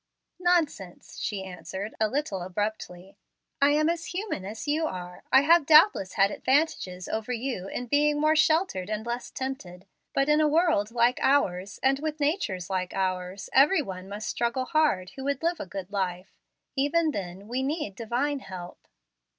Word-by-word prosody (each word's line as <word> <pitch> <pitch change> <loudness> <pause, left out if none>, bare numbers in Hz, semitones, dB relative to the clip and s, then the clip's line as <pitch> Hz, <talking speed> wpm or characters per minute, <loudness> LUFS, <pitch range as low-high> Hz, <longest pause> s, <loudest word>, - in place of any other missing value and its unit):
"Nonsense!" 325 - -1
she 200 -3 -3
answered, 190 +2 -6
a 220 - +3
little 245 -7 -2
abruptly. 190 0 -4 0.4
"I 280 - +6
am 305 +1 +3
as 335 0 -1
human 365 - -4
as 215 +7 -7
you 310 +2 +1
are. 180 -4 -7
I 265 - +7
have 320 0 +4
doubtless 305 - +6
had 200 0 +3
advantages 260 - 0
over 220 +2 -3
you 240 -6 -3
in 245 - -4
being 295 +3 +2
more 310 +1 +3
sheltered 315 - +2
and 215 +1 -3
less 240 +1 -4
tempted. 195 -9 -6 0.3
But 275 0 +2
in 300 +1 +4
a 305 - +4
world 310 - +2
like 240 +1 +2
ours, 200 -8 +1
and 270 +1 +3
with 310 0 -3
natures 285 - -1
like 185 -1 -3
ours, 185 0 -2
every 300 +5 +5
one 190 -3 -8
must 210 +3 -5
struggle 240 +2 -1
hard 255 - +1
who 270 - -8
would 280 +1 -1
live 340 +1 0
a - - -5
good 190 +1 -7
life. 185 -2 -3 0.4
Even 305 +4 +2
then 195 -2 -6
we 250 +3 -2
need 280 - -2
Divine 245 +7 -1
help." 180 -6 -10
240 Hz, 170 wpm, -27 LUFS, 190-295 Hz, 0.4 s, I